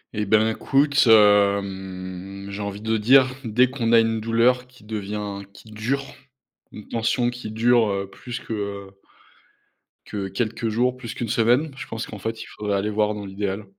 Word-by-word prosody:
Eh 105 - -1
ben, 110 +2 +4
écoute, 135 +4 +2
hem, 100 -3 +2
j'ai 100 +1 -6
envie 100 0 -5
de 110 +1 0
dire 130 +4 +5
dès 120 +3 +3
qu'on 120 -4 -1
a 115 - +8
une 115 0 +1
douleur 115 +3 +2
qui 125 -3 -20
devient 105 -1 -4
qui 110 - -15
dure, 120 +6 -2 0.7
une 105 - -11
tension 120 +2 0
qui 120 -2 -6
dure, 115 +1 +3
heu, 100 0 -2
plus 120 -1 -7
que, - - -8
heu 100 -2 -5 1.1
que 100 -2 -4
quelques 115 +3 -2
jours, 120 +3 +1
plus 115 -3 -7
qu'une 120 -2 -4
semaine, 120 +7 +2
je - - -7
pense 115 +1 -5
qu'en 105 - -8
fait, 110 +1 -4
il - - -7
faudrait 105 -1 -3
aller 105 +2 -1
voir 105 0 +1
dans 105 -1 -6
l'idéal, 100 +1 -4
110 Hz, 180 wpm, -23 LUFS, 100-120 Hz, 1.1 s, a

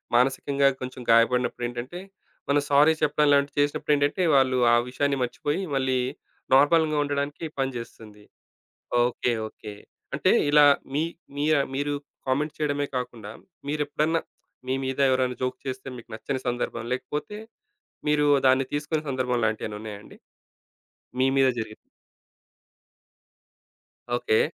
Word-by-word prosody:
మానసికంగా 140 +2 +2
కొంచెం 130 0 -6
గాయపడినప్పుడు 120 +1 +3
ఏంటంటే, 125 +8 -6 0.5
మనం 145 +1 +3
సారీ 145 +3 +6
చెప్పడం 150 0 +3
లాంటివి 140 +1 +1
చేసినప్పుడు 145 +1 +1
ఏంటంటే, 145 +6 +1
వాళ్ళు 130 -1 +3 0.2
ఆ - - +7
విషయాన్ని 140 +1 0
మర్చిపోయి, 145 +7 -2
మళ్ళీ 130 -1 +1 0.6
నార్మల్‌గా 155 +2 +4
ఉండడానికి 145 +2 -3
పనిచేస్తుంది. 115 -5 -5 0.8
ఓకే. 125 0 0
ఓకే. 105 -1 -10 0.4
అంటే - - +2 0.2
ఇలా 150 0 +7 0.3
మీ 155 - +2 0.3
మీ 145 - 0 0.3
మీరు 145 +1 -1 0.3
కామెంట్ 145 +4 0
చేయడమే 145 -1 0
కాకుండా, 115 -4 -6 0.4
మీరెప్పుడన్నా 150 +2 0 0.5
మీ 130 - +1
మీద 130 +1 -3
ఎవరైనా 130 -1 +1
జోక్ 130 0 -2
చేస్తే 130 +1 -5
మీకు 120 - -13
నచ్చని 130 +3 -4
సందర్భం, 120 -1 -2
లేకపోతే 150 +9 -4 0.7
మీరు 150 0 +3 0.2
దాన్ని 130 +1 +4
తీసుకునే 150 +1 -2
సందర్భం 125 -2 0
లాంటివేమైనా 110 -1 -2
ఉన్నాయా 105 -2 -7
అండి? - - -15 1.0
మీ 130 - +4
మీద 135 - +5
జరిగింది? 110 -1 -6 2.4
ఓకే. 110 -2 +2
135 Hz, 120 wpm, -25 LUFS, 125-145 Hz, 2.4 s, ఆ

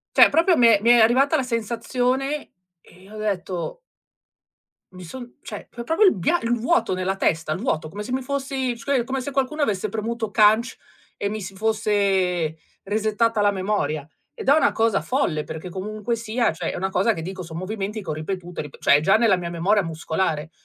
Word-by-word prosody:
cioè - - +8
proprio 335 +3 +3
mi 240 - +6
è 220 -3 +5
mi 230 - +2
è 240 - +7
arrivata 260 +7 +4
la 280 - +1
sensazione 250 +4 -2 0.3
e 185 +5 -18
ho 215 - -9
detto 200 - -3 1.1
mi 185 0 -11
son 245 +7 -9
cioè, 210 - -8
pro 235 - -8
proprio 325 - +3
il 380 - +5
bia 265 - +1
il 230 0 0
vuoto 265 - +1
nella 185 +1 -1
testa. 165 -4 0
Il 155 - -2
vuoto, 160 -9 -2
come 205 +6 -6
se 225 - -7
mi 260 - 0
fossi 265 -2 -2
scui 255 +1 0
come 265 +3 -3
se 285 - -5
qualcuno 275 +3 -1
avesse 215 -6 0
premuto 225 +1 -3
CANC 220 +3 +3 0.4
e 200 - -2
mi 215 +1 -4
si 190 0 -8
fosse 195 -6 +1 0.3
resettata 215 +2 0
la 205 0 +4
memoria. 185 -7 -2 0.3
Ed - - -8
è 275 - +7
una 315 - +3
cosa 225 0 +1
folle 210 - -1
perché 160 +4 -7
comunque 210 +5 -3
sia, 230 -1 0
cioè, 165 0 -3
è - - -6
una 190 +2 -1
cosa 195 +4 +2
che 165 - -6
dico, 185 +2 -6
son 165 -1 -8
movimenti 205 +3 -4
che 170 - -8
ho - - 0
ripetuto 175 +3 -5
e - - -1
rip 150 - -12
cioè 140 - +5
è - - -1
già 195 +7 +4
nella 225 -4 +4
mia 175 -1 -4
memoria 190 +5 +1
muscolare. 160 -1 -2
210 Hz, 205 wpm, -23 LUFS, 185-240 Hz, 1.1 s, cioè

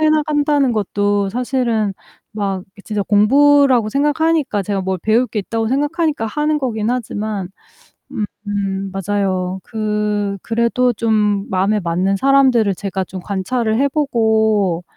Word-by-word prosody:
해 310 - +4
나간다는 295 -3 +2
것도 205 -1 0
사실은 235 -3 -1 0.4
막 195 -3 -2
이게 200 - -16
진짜 210 -2 -2
공부라고 255 +3 +4
생각하니까 295 -3 +1
제가 195 0 -2
뭘 190 0 -2
배울 225 +6 +2
게 220 - -4
있다고 225 +3 -2
생각하니까 290 -1 0
하는 300 +6 0
거긴 230 -5 -2
하지만 215 -5 -3 1.0
음 195 -1 -2
맞아요. 190 -1 -2
그 210 -2 -2
그래도 235 +2 +1
좀 210 -2 0
마음에 195 +3 +1
맞는 180 +3 0
사람들을 255 -3 +3
제가 195 0 -3
좀 185 +1 -8
관찰을 220 +4 -1
해 280 - +3
보고 220 - +1
215 Hz, 290 characters per minute, -18 LUFS, 200-255 Hz, 1.0 s, 해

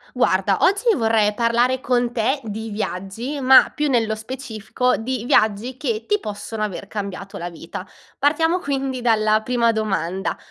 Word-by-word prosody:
Guarda, 195 -3 +2
oggi 400 +5 +3
vorrei 220 -3 +2
parlare 240 +3 +2
con 245 -2 0
te 255 +5 0
di 220 +1 -5
viaggi, 210 +7 -4
ma 260 0 +7
più 300 -1 0
nello 230 -4 +1
specifico 230 +1 -2
di 240 0 -3
viaggi 220 +2 +2
che 235 -5 -3
ti 415 0 +1
possono 215 - -6
aver 205 -2 -3
cambiato 200 -1 -6
la 175 +1 -4
vita. 170 +2 -8 0.4
Partiamo 325 +5 +2
quindi 270 -4 -2
dalla 215 -2 +3
prima 235 0 +2
domanda: 195 -4 -2
225 Hz, 150 wpm, -21 LUFS, 210-260 Hz, 0.4 s, ma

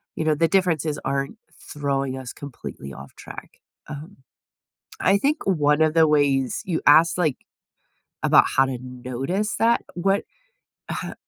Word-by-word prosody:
you 160 - -2
know, 155 -1 +2
the 165 +2 +2
differences 165 -5 +1
aren't 140 +9 -2 0.4
throwing 140 -2 -2
us 130 -2 -7
completely 115 - -9
off 70 +1 -12
track. - - -11 0.3
Um, 150 +6 -9 0.8
I 195 - +4
think 290 +8 +1
one 150 -5 +2
of 155 0 +3
the 160 -1 +5
ways 140 -3 +2
you 170 -4 -1
ask, 165 +4 +6
like, 155 -7 +1 0.9
about - - +6
how 135 - +5
to 130 -2 -3
notice 130 - -3
that, 230 +1 +3
what 195 +3 +1 0.7
ha - - -4
150 Hz, 145 wpm, -23 LUFS, 135-175 Hz, 0.9 s, ask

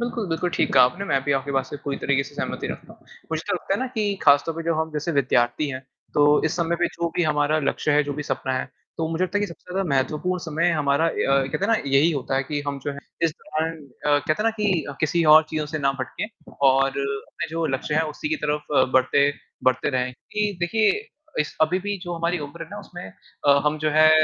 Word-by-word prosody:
बिल्कुल, 235 -2 -2
बिल्कुल 165 +2 -1
ठीक - - 0
कहा 130 -2 +8
आपने। 175 +11 -1
मैं 135 -8 +1
भी 145 - +2
आपकी 135 +1 -1
बात 135 -1 0
से 145 - -7
पूरी 140 - -2
तरीके 140 -1 +1
से 145 +2 -12
सहमति - - -3
रखता - - -7
हूँ। - - -22 0.3
मुझे 160 0 -1
तो 200 - +2
लगता 190 +2 -1
है - - -1
ना 260 - 0
कि 210 -3 0
खास 145 -1 +6
तौर 165 - -2
पर 165 - -4
जो 165 - +1
हम 160 +1 -1
जैसे 155 +3 -2
विद्यार्थी 125 +2 +2
हैं, 130 -1 -5 0.3
तो 145 0 +5
इस 160 +1 0
समय 170 -1 0
पे 175 0 +2
जो 170 0 -1
भी 175 - +3
हमारा 150 0 +2
लक्ष्य 150 +1 0
है, 150 +1 +4
जो 145 - -3
भी 150 +1 -4
सपना 130 -2 -2
है, - - -5 0.3
तो 160 -1 0
मुझे 165 +2 -1
लगता 205 +3 -1
है - - -2
कि 205 - 0
सबसे 180 0 -11
ज़्यादा 190 -1 -1
महत्वपूर्ण 150 +7 0
समय 165 +2 +1
हमारा 150 -1 +2
ए - - -1
अ, 135 - +3
कहते 135 +8 -2
हैं - - +2
ना, 225 - +4
यही 140 +4 +4
होता 135 -2 -2
है 135 - +2
कि 145 +1 -3
हम 140 -1 -2
जो 145 - -2
हैं, 140 - -9 0.2
इस 165 - +4
दौरान 160 +1 -3 0.3
अ, 145 0 +4
कहते 145 +2 0
हैं 210 +8 -2
ना 225 - +4
कि 195 -7 +1 0.2
किसी 165 +2 +2
और 155 - +9
चीज़ों 155 -1 -2
से 155 +1 -4
ना 135 -2 +2
भटकें 130 +10 -4 0.4
और 135 +1 +4
अपने 140 0 -4
जो 165 +1 -2
लक्ष्य 150 - -4
हैं, 155 - +3
उसी 155 - -4
की 315 - 0
तरफ 150 0 -1 0.3
बढ़ते 140 +2 +4 0.3
बढ़ते 130 0 +2
रहें। 125 -1 -1 0.2
कि 210 -1 0
देखिए, 210 +5 +3 0.5
इस 150 - -3
अभी 165 +4 +3
भी 205 +1 -2
जो 175 -1 -5
हमारी 170 +1 -1
उम्र 165 +4 -9
है 165 - -9
ना, 205 - -7
उसमें 180 -3 -10 0.4
अ, 140 0 +6
हम, 150 +1 +1
जो 155 0 0
है, 155 +1 +6
155 Hz, 255 wpm, -24 LUFS, 140-175 Hz, 0.5 s, और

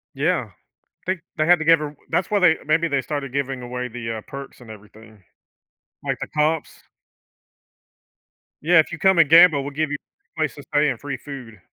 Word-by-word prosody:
Yeah. 145 - 0 0.5
Think 185 -1 -2 0.2
they 155 - +2
had 175 0 +5
to - - -2
give 165 -1 +6
her 150 - -3
w 145 - -12 0.2
that's 175 +2 0
why 210 - +2
they 165 -4 +5
maybe 160 +2 +2
they 140 -1 +1
started 140 0 -4
giving 135 -2 -2
away 125 0 -5
the, 115 -1 -5
uh, - - -7
perks 140 -1 -9
and 120 - -14
everything. 110 0 -15 0.8
Like, - - -2
the - - -3
comps? 155 +1 0 1.9
Yeah, 165 +2 +5
"If 155 - +2
you 170 - -5
come 190 +2 +3
and 160 -4 +5
gamble, 165 -2 +7
we'll 145 - -5
give 155 +1 -2
you 145 - -1 0.4
place 155 -6 -1
to 145 - -11
stay 150 -1 +1
and 125 - -3
free 140 -2 -5
food." 125 -6 -10
145 Hz, 200 wpm, -22 LUFS, 125-160 Hz, 1.9 s, gamble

